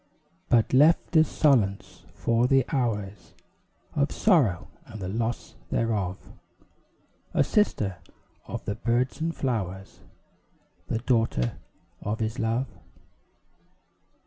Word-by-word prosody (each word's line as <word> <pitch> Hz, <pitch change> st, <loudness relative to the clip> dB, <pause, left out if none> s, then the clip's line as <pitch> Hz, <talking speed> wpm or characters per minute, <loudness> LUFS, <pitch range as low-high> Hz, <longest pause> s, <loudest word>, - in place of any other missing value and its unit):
But 115 Hz, 0 st, +3 dB
left 155 Hz, +6 st, +4 dB
as 160 Hz, 0 st, +6 dB
solace 110 Hz, -10 st, +1 dB
for 115 Hz, +1 st, +2 dB
the 135 Hz, -1 st, +3 dB
hours 105 Hz, -7 st, -3 dB, 0.6 s
Of 145 Hz, 0 st, +1 dB
sorrow 140 Hz, -, +2 dB, 0.2 s
and 110 Hz, -, -9 dB
the 95 Hz, -, -4 dB
loss 115 Hz, +4 st, -3 dB, 0.2 s
thereof; 100 Hz, -5 st, -1 dB, 1.2 s
A -, -, +5 dB
sister 105 Hz, -, +1 dB, 0.5 s
of -, -, -6 dB
the 100 Hz, -, -1 dB
birds 120 Hz, +7 st, -1 dB
and 165 Hz, +1 st, -1 dB
flowers, 95 Hz, -7 st, -3 dB, 0.9 s
The -, -, -1 dB
daughter 115 Hz, -, 0 dB, 0.4 s
of 105 Hz, +2 st, -3 dB
his 110 Hz, +1 st, -2 dB
love. 115 Hz, +3 st, 0 dB
115 Hz, 105 wpm, -26 LUFS, 100-135 Hz, 1.2 s, as